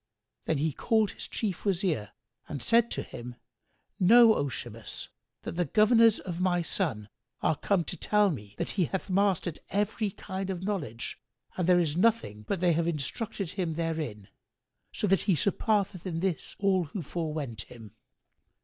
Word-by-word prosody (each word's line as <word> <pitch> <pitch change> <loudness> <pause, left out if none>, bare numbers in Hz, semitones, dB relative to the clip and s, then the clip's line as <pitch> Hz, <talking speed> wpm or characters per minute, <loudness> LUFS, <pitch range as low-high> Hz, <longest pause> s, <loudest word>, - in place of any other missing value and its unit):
Then 155 - +1
he 155 +1 0
called 220 - +2
his - - -7
Chief 200 -6 -3
Wazir 175 - 0 0.4
and 140 -6 -4
said 235 - +4
to - - -2
him, 120 +1 -8 0.6
"Know, 225 +4 +8
O 140 - 0
Shimas, 115 -3 -7 0.3
that - - -4
the 175 +1 0
governors 225 +2 +5
of 180 -1 -5
my 175 -2 +2
son 150 - -1 0.4
are - - +3
come 185 +4 +1
to - - -4
tell 210 -2 +3
me 105 -8 -8
that - - -2
he 185 -4 +1
hath 190 +3 -4
mastered 190 -4 +1
every 210 +1 0
kind 190 0 -5
of 185 -1 -3
knowledge 160 - -3 0.4
and 180 -2 -1
there 180 - +6
is 160 -4 +1
nothing 175 - +1
but 190 - -1
they 175 -2 +4
have 165 +1 +1
instructed 170 - -2
him 175 -5 -2
therein, 155 -12 -3 0.6
so - - -2
that 195 -2 +3
he 185 - +5
surpasseth 200 - 0
in 165 -2 -2
this 185 -2 -2
all 190 -3 +2
who 170 +4 -5
forewent 150 - -4
him. 110 -4 -12
180 Hz, 165 wpm, -29 LUFS, 150-200 Hz, 0.6 s, Know